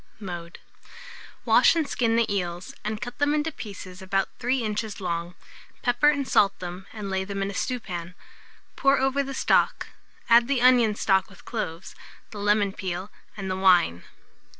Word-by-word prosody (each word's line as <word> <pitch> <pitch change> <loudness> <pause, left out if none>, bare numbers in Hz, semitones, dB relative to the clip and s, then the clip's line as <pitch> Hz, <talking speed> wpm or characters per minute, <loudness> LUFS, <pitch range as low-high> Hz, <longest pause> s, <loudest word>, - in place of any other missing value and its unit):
Mode. 175 -4 -7 0.9
Wash - - +5
and 320 -3 0
skin 230 -4 +1
the 230 0 +3
eels, 175 -1 -4
and 215 0 -3
cut 245 +3 -7
them 290 +1 +2
into 305 +2 0
pieces 190 -7 -9
about 195 0 0
3 250 +1 0
inches 215 0 -3
long; 170 -1 -3 0.5
pepper 245 +4 +4
and 285 -3 0
salt 200 -1 +3
them, 180 +1 -7
and 210 -3 -6
lay 190 0 0
them 195 0 -3
in 195 - -2
a - - -9
stewpan; 185 -7 -4 0.6
pour 275 0 +3
over 270 +1 +1
the 275 -1 -5
stock, - - +2 0.4
add 235 0 +6
the 275 -2 +1
onion 240 -4 +5
stuck 195 0 +2
with 195 - -17
cloves, 180 -6 -5 0.4
the 210 - -8
lemon 205 -1 +2
peel, 185 +1 -5 0.3
and 195 -2 -5
the 185 - -1
wine. 180 - +4
205 Hz, 170 wpm, -25 LUFS, 185-245 Hz, 0.9 s, add